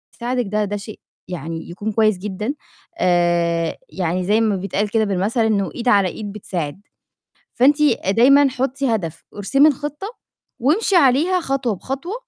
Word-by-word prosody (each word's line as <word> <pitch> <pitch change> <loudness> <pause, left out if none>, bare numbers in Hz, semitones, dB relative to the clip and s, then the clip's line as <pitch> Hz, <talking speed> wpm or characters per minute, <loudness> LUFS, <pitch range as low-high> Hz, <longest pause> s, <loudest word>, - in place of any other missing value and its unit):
يساعدِك 245 0 -2
ده 210 +1 0
ده 205 +1 -3
شيء 210 +1 -9 0.3
يعني 165 -1 -6
يكون 205 +5 -4
كويس 215 -2 +2
جدًا، 210 +6 -4 0.4
آآ 170 -2 +1
يعني 180 0 -2
زي 215 +3 +2
ما 215 -3 +1
بيتقال 200 +2 -2
كده 220 0 +1
بالمَثل 200 +5 0
إنه 200 -3 0
إيد 245 0 -5
على 200 -4 +4
إيد 205 +1 -7
بتساعد. 180 -4 -5 0.7
فأنتِ 285 +5 +3
آآ 235 -9 +2
دايمًا 275 +6 +5
حُطّي 260 -1 -1
هدف 165 -5 -5
وارسمي 275 +9 +3
الخِطّة 295 +6 -4 0.5
وامشي 360 - +2
عليها 325 +5 +4
خطوة 265 -7 -1
بخطوة، 275 - -5
215 Hz, 150 wpm, -20 LUFS, 190-265 Hz, 0.7 s, دايمًا